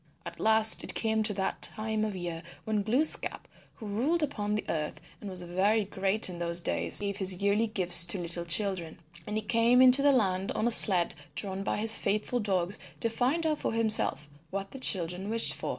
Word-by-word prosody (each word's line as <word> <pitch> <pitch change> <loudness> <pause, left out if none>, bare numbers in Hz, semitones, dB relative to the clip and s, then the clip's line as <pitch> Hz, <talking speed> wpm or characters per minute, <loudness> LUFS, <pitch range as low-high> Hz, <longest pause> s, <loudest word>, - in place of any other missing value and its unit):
At - - -10
last 220 0 +5
it - - -8
came 220 -1 -1
to 215 -1 +1
that 190 -1 -4
time 220 0 -3
of 215 -2 -4
year 175 -2 -6 0.2
when 215 -1 -2
Glooskap, 250 +10 -1 0.3
who 220 - -11
ruled 265 +11 -1
upon 210 -8 -3
the 215 - -4
earth 155 -2 -4 0.2
and 205 - -8
was 185 -1 -6
very 195 +5 0
great 195 +2 -1
in 175 -2 -9
those 170 0 +2
days, - - -1
gave 200 -1 -4
his 190 -2 0
yearly 205 +3 0
gifts 180 -5 +5
to 175 +3 -1
little 170 -1 -5
children. 170 -2 -1 0.3
And 210 - -5
he 215 - -3
came 230 +3 +2
into 260 +1 +6
the 285 0 +4
land 195 -7 -1
on 215 - -3
a - - +1
sled 185 -6 +6 0.2
drawn 195 -1 -4
by 195 - -3
his 220 +1 +4
faithful 215 +5 -2
dogs 190 -3 -3 0.2
to 230 - -1
find 265 +8 -1
out 310 -2 -1
for - - -3
himself 215 -10 -1 0.2
what 195 0 -6
the 270 - -9
children 185 -3 +1
wished 230 +1 +2
for. - - -7
205 Hz, 205 wpm, -28 LUFS, 185-225 Hz, 0.3 s, into